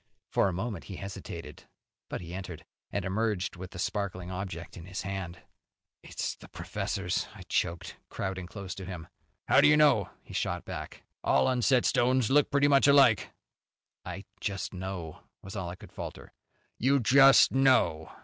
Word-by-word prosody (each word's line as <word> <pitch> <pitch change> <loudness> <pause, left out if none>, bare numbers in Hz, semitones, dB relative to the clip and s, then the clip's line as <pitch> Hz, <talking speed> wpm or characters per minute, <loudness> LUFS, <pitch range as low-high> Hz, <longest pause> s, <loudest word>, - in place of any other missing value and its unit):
For - - +3
a - - 0
moment 95 +1 -4
he 95 - -7
hesitated, 90 -5 -8 0.4
but - - -4
he 85 0 -8
entered, 90 -3 -7 0.2
and 100 -3 -3
emerged 100 -1 -1
with 90 0 -8
the 95 - -11
sparkling 95 -1 -3
object 90 -3 -6
in 85 - -9
his 95 0 -5
hand. 95 -3 -5 0.6
"It's - - -4
the - - -14
professor's," 90 -2 -3
I - - -10
choked, 85 0 -2
crowding 95 -2 -4
close 95 0 -7
to 95 - -8
him. 90 -4 -7 0.4
"How'd - - +6
you 150 0 +6
know?" 140 -11 +4
he - - -13
shot - - -2
back. - - -7 0.2
"All 65 - +3
unset 125 0 +3
stones 125 -1 +2
look 145 +1 +4
pretty 140 +1 +3
much 140 -1 +5
alike." 135 -7 +5 0.7
"I 100 - -7
just 100 -1 -3
know," 90 -4 -6 0.2
was 95 +1 -8
all 90 -4 -3
I 90 - -6
could - - -14
falter. - - -8 0.5
"You 135 +3 +3
'just 135 +4 +7
know'." 130 -12 +3
95 Hz, 165 wpm, -29 LUFS, 90-120 Hz, 0.7 s, just